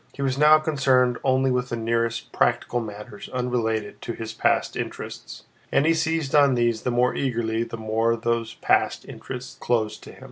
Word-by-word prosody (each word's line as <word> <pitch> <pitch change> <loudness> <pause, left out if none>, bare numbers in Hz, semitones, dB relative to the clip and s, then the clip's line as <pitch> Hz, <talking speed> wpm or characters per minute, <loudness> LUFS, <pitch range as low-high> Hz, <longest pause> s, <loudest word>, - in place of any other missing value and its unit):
He 140 - -4
was 130 -1 0
now 150 +2 +7
concerned 135 -5 +2
only 130 0 +2
with 125 0 -1
the - - -2
nearest 115 0 -1
practical 120 0 +1
matters 105 -2 -8
unrelated 115 -4 -2
to 115 - -4
his 110 -1 -6
past - - +1
interests, - - -6 0.3
and 140 - +3
he 165 - +4
seized 160 -3 -1
on 140 -3 +5
these 120 -2 +1
the - - -1
more 125 +1 +2
eagerly 115 -4 -1
the 115 0 -4
more 110 +1 +1
those 115 -1 -2
past - - +1
interests 125 -1 -8
were - - -13
closed 110 -3 0
to - - -11
him. - - -16
120 Hz, 185 wpm, -24 LUFS, 115-130 Hz, 0.3 s, now